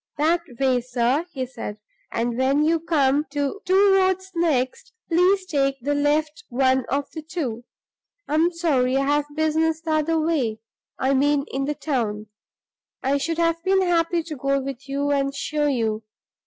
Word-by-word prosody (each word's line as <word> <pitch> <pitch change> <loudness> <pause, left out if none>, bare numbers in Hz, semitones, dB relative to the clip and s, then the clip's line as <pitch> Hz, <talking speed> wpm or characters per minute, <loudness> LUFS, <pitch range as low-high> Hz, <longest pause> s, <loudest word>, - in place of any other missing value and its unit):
"That 325 +4 +2 0.2
way, 260 -2 +2
sir," 250 +6 0
he 260 -5 -3
said, 230 -4 -7 0.3
"and 235 +1 -1
when 270 +4 +2
you 330 +1 +2
come 295 -3 +2
to 290 +7 -2
two 385 +1 +5
roads 375 0 +2
next, 300 - -1
please 370 +3 +3
take 275 -5 0
the 285 +4 -1
left 295 +1 0
one 260 0 +2
of 280 +2 -2
the 315 - -6
two. 285 -8 -4 0.6
I - - -3
am 325 +3 +3
sorry 275 -7 +1
I 275 - +1
have 290 +1 +1
business 315 +1 +1
the 325 -1 -3
other 310 +1 +1
way, 295 -9 0 0.4
I 265 +1 +1
mean 285 +1 +2
in 270 +1 -1
the 295 +1 -2
town. 220 -9 -2 0.7
I 275 +2 +2
should 330 +3 -2
have 335 0 +1
been 380 0 +3
happy 340 -1 +1
to 315 -1 -6
go 275 +1 0
with 270 0 -7
you 285 +1 0
and 275 -1 0
show 300 0 -1
you. 225 -5 0
290 Hz, 170 wpm, -23 LUFS, 265-330 Hz, 0.7 s, two